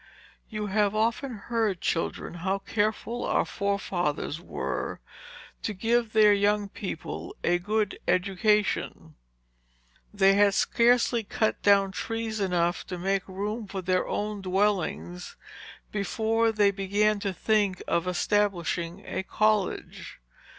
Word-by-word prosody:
You 215 -2 -3
have 205 0 +1
often 230 +4 0
heard, 220 -3 -1
children, 165 0 -2
how 190 +2 0
careful 220 +4 -2
our - - +1
forefathers 175 -6 -2
were, - - -4 0.6
to 210 - -3
give 230 +2 +1
their 215 -1 +6
young 205 0 +1
people 190 -5 -6
a 175 0 +2
good 210 +2 -1
education. 195 +3 +1 1.0
They 195 -1 +4
had 200 0 +4
scarcely 235 0 +3
cut 220 0 -1
down 200 -1 +4
trees 225 +2 -3
enough 175 -3 0
to 180 - -5
make 195 +2 -1
room 205 +3 -4
for 195 -1 -5
their 185 0 +1
own 210 -1 -3
dwellings, 185 -2 -1 0.6
before 225 +3 +1
they 205 -2 +3
began 205 +2 +1
to 200 -1 -2
think 205 -1 0
of 170 +1 0
establishing 180 -2 0
a - - -3
college. 215 0 -1
205 Hz, 120 wpm, -27 LUFS, 190-215 Hz, 1.0 s, their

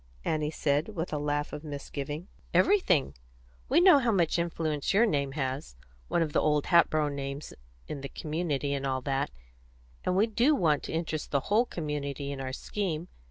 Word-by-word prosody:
Annie 155 -1 0
said, 155 +6 0
with 165 -1 -3
a 150 - 0
laugh 145 0 -1
of 150 - -6
misgiving. 145 +2 -5 0.3
"Everything. 190 - +3 0.6
We 290 - +5
know 355 -5 +8
how 240 -3 +2
much 175 -4 +2
influence 160 -2 -1
your 225 +4 +6
name 140 -9 0
has 130 - -3 0.3
one 170 - +2
of 155 - -4
the - - +3
old 150 -1 +2
Hatboro' 155 -3 +4
names 140 0 -5 0.3
in 140 - -5
the 140 - -5
community, 150 -3 -2
and 135 -1 -2
all 130 -1 -1
that; 135 0 -1 0.7
and 180 - +1
we 205 - +5
do 235 +7 +3
want 155 - +2
to - - -5
interest 160 -1 -2
the 140 - +2
whole 235 +3 +4
community 145 - -4
in 135 -1 -5
our 130 0 -3
scheme. 175 +3 -3
150 Hz, 180 wpm, -29 LUFS, 140-175 Hz, 0.7 s, know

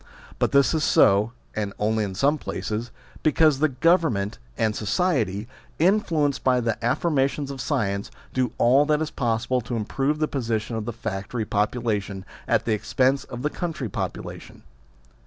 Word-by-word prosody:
But - - +1
this 140 +2 +4
is 155 -1 +1
so 100 -1 +4 0.2
(and 105 -2 -2
only 110 +1 +1
in 95 -2 -4
some 145 +8 +2
places) 110 0 -4 0.3
because 155 -2 +4
the 155 +1 +3
Government 130 - +1 0.2
and 110 -3 +1
society, 110 - 0 0.3
influenced 165 -6 +2
by 130 -1 +3
the 115 -1 -2
affirmations 140 +2 +1
of 135 - -6
science, 100 -8 -1 0.2
do 130 -3 0
all 135 +5 +4
that 150 -1 +3
is 155 - -5
possible 120 +1 0
to 120 +1 -4
improve 135 +7 -1
the 155 0 +1
position 115 -4 -2
of 110 -1 -3
the 120 - -2
factory 110 0 -4
popu 105 +4 0
lation 100 -4 -2 0.2
at - - +2
the 115 - +1
expense 130 +5 +1
of 125 0 -7
the 150 - 0
country 165 - -4
popula - - -5
tion. - - -15
125 Hz, 165 wpm, -24 LUFS, 110-145 Hz, 0.3 s, this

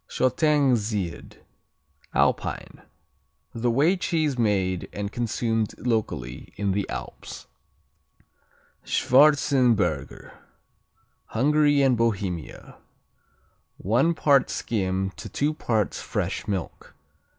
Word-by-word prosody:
Shottengsied 125 - 0 0.7
Alpine - - -1 0.7
A 120 +1 -1
whey 145 +10 +3
cheese 160 -6 0
made 95 -6 0
and 100 0 -5
consumed 115 -2 -1
locally 105 - -3
in 100 -1 -1
the 100 +1 -2
Alps. - - -8 1.4
Schwarzenberger 125 - +2 0.9
Hungary 145 +3 +2
and 130 -2 +4
Bohemia 100 -8 -3 1.0
One 125 - +1
part 140 -3 +3
skim 95 -3 -2
to - - -8
two 150 +2 0
parts 110 -8 -1
fresh - - -3
milk. 95 -4 -5
115 Hz, 85 wpm, -25 LUFS, 100-140 Hz, 1.4 s, and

